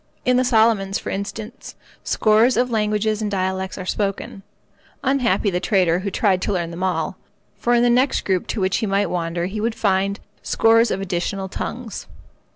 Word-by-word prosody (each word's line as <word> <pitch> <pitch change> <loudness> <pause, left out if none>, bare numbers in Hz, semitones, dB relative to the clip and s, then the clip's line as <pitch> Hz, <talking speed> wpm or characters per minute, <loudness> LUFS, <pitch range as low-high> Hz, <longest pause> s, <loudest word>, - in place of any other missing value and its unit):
In 250 - +3
the 255 - +3
Solomons, 220 -5 +2
for - - -6
instance, 215 +5 -6 0.3
scores 220 +3 +3
of 250 0 +1
languages 215 0 0
and 210 - -1
dialects 190 -1 -2
are 185 - -6
spoken. 195 0 -3 0.6
Unhappy 235 -7 +1
the 180 - 0
trader 180 -3 +2
who 200 +2 -3
tried 190 -1 +1
to - - -1
learn 170 -3 -2
them 170 +2 -7
all; 185 -1 -1 0.4
for 240 0 +2
in 240 - +3
the 245 - +4
next 255 +3 +2
group 185 -2 0
to - - -3
which 190 0 +1
he 220 - -1
might 200 -1 0
wander 170 0 -2
he 205 +3 -4
would 225 +1 -1
find 195 -1 0 0.2
scores 230 +1 +3
of 195 - -2
additional 190 +1 -2
tongues. 230 +3 -6
200 Hz, 180 wpm, -21 LUFS, 190-225 Hz, 0.6 s, the